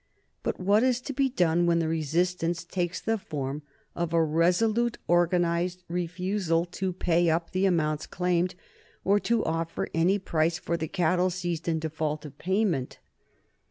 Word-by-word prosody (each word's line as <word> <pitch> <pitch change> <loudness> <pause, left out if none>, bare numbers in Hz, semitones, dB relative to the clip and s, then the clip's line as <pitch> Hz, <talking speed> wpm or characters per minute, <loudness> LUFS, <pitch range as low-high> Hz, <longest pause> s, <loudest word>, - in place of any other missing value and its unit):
But - - -2
what 200 +3 +3
is 250 -1 +2
to 280 - -5
be 275 0 +2
done 175 -7 +2
when 170 0 +3
the 165 -1 +1
resistance 165 +2 0
takes 175 +1 -2
the 225 -1 -1
form 145 -4 -4 0.3
of 170 -1 -2
a 165 -1 +4
resolute 210 +9 +2
organized 175 +1 +1
refusal 180 0 -1
to 185 +2 -3
pay 175 -1 +2
up 165 +1 0
the 190 +1 +2
amounts 155 -4 0
claimed 180 0 0 0.5
or 200 +2 +3
to 230 +1 0
offer 165 +1 -2
any 175 +5 +3
price 165 -3 0
for 175 -1 -2
the 160 -1 -3
cattle 180 +1 +1
seized 175 -2 -3
in 165 -1 +1
default 155 -1 -3
of 145 -2 -9
payment? 185 -8 0
175 Hz, 160 wpm, -27 LUFS, 165-185 Hz, 0.5 s, a